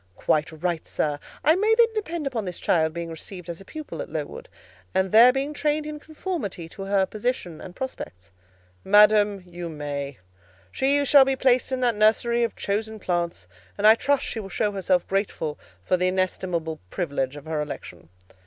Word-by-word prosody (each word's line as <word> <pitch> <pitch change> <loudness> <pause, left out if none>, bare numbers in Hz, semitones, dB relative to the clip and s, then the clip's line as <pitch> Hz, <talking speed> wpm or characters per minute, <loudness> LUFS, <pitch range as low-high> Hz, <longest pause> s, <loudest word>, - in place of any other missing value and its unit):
"Quite 155 - +1
right, 165 +1 -3
sir. 145 -1 -1 0.2
I 315 - +5
may 430 +4 +3
then 465 -1 +4
depend 340 -8 -3
upon 240 -6 -2
this 180 -2 -5
child 160 -2 +2
being 170 0 -5
received 180 +2 -8
as 170 +2 -6
a - - -13
pupil 310 - -7
at - - -7
Lowood, - - -6 0.5
and 190 0 +1
there 235 +3 +8
being 275 +3 -2
trained 300 +1 0
in 300 0 -6
conformity 300 - -5
to 195 +3 -8
her 195 -1 +2
position 210 -7 -3
and 180 - -10
prospects?" 95 - -7 0.5
"Madam, 205 -1 +5
you 175 -1 -7
may: 145 -3 -5 0.5
she 280 +2 +2
shall 280 0 +8
be 270 0 0
placed 255 -1 +2
in 260 -1 -1
that 245 -2 +3
nursery 225 +3 +3
of 230 -2 0
chosen 220 +2 -2
plants, 175 -3 -2 0.3
and 205 - -1
I 215 - +10
trust 275 +4 +1
she 225 - -4
will 195 -3 -7
show 205 +3 0
herself 185 -2 0
grateful 190 -6 -2 0.2
for 185 - +2
the 180 +1 +1
inestimable 180 -3 -1
privilege 140 - -2
of 145 0 -10
her 160 -1 -2
election." 145 - -8
200 Hz, 180 wpm, -25 LUFS, 170-260 Hz, 0.5 s, I